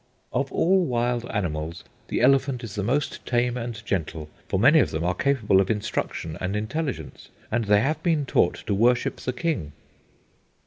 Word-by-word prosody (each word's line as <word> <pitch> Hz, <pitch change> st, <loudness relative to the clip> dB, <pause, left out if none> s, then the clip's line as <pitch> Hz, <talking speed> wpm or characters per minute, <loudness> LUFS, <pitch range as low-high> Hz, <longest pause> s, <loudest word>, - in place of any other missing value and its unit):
"Of -, -, -1 dB
all 190 Hz, +2 st, +3 dB
wild 120 Hz, -3 st, -1 dB
animals, 85 Hz, -5 st, -3 dB, 0.2 s
the -, -, -1 dB
elephant 135 Hz, 0 st, +3 dB
is 110 Hz, -4 st, -6 dB
the 105 Hz, -, -2 dB
most 130 Hz, +8 st, -1 dB
tame 120 Hz, 0 st, +1 dB
and 115 Hz, -2 st, -5 dB
gentle; 80 Hz, -4 st, -3 dB, 0.2 s
for -, -, 0 dB
many 140 Hz, -, +6 dB
of 130 Hz, -, +3 dB
them 80 Hz, +1 st, -3 dB
are 90 Hz, +1 st, +1 dB
capable 110 Hz, -6 st, +2 dB
of 95 Hz, -, -2 dB
instruction 105 Hz, -6 st, -3 dB
and 95 Hz, +2 st, -2 dB
intelligence, 110 Hz, -, -4 dB, 0.2 s
and 115 Hz, 0 st, 0 dB
they 105 Hz, 0 st, +4 dB
have 150 Hz, +6 st, 0 dB
been 160 Hz, -5 st, +1 dB
taught -, -, +1 dB
to -, -, 0 dB
worship 120 Hz, +4 st, +2 dB
the 130 Hz, -, -3 dB
king." 120 Hz, -, -2 dB
115 Hz, 175 wpm, -25 LUFS, 95-135 Hz, 0.2 s, many